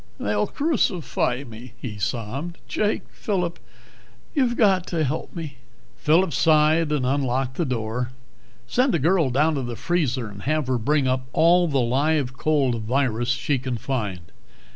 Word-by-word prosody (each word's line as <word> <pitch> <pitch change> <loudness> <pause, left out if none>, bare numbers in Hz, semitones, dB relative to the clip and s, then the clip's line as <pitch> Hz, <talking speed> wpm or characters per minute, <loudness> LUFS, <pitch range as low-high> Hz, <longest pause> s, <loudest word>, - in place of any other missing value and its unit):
"They'll 105 0 0
crucify 180 - 0
me!" 115 -1 -11
he 105 -5 -6
sobbed. 130 - -3
"Jake 210 0 0
Phillip 180 -5 -2 0.7
you've 255 -5 +1
got 190 -5 +3
to 165 -3 0
help 150 +2 -3
me." 155 -5 -6 0.4
Phillip 165 +2 +2
sighed 155 +2 +3
and 145 -4 +1
unlocked 130 -1 0
the 170 - 0
door. 120 -1 -2 0.6
"Send 250 - +2
a - - +3
girl 165 0 +2
down 150 +6 +2
to 140 - -1
the 120 -2 -4
freezer 130 -7 -1
and 100 -1 -10
have 155 +1 0
her 125 -1 0
bring 145 +3 +1
up 130 0 0
all 175 +2 +5
the 140 -4 +1
live 135 +2 +1
cold 135 -7 +1
virus 120 0 0
she 125 +2 0
can 125 -1 -3
find. 105 -7 -3
140 Hz, 155 wpm, -24 LUFS, 125-165 Hz, 0.7 s, all